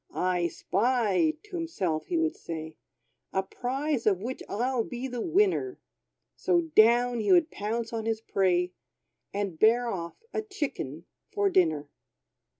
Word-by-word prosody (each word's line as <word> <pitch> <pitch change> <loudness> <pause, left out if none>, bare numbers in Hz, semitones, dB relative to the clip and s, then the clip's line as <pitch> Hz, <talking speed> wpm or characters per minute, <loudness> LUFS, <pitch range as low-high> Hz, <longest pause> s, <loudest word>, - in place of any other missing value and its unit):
"I 180 -1 +1
spy," 200 -3 +1
to 420 -3 -9
himself 195 - -2
he 350 - 0
would 325 0 +1
say, 160 -1 -7 0.6
"A 190 - +1
prize 260 +5 -2
of 195 -4 +3
which 245 +6 -5
I'll 245 +3 0
be 245 +3 -5
the 245 -2 -4
winner!" 385 - +2 0.6
So 345 -1 +2
down 240 +2 +5
would - - -1
he 350 - +6
pounce 225 +3 -3
on 225 -1 -3
his 225 -1 0
prey, 180 -4 +1 0.6
And 200 -5 -3
bear 235 +2 +4
off 170 - -5
a - - 0
chicken 275 - -4 0.2
for 200 -1 +1
dinner. 155 -5 +2
225 Hz, 145 wpm, -28 LUFS, 185-260 Hz, 0.6 s, he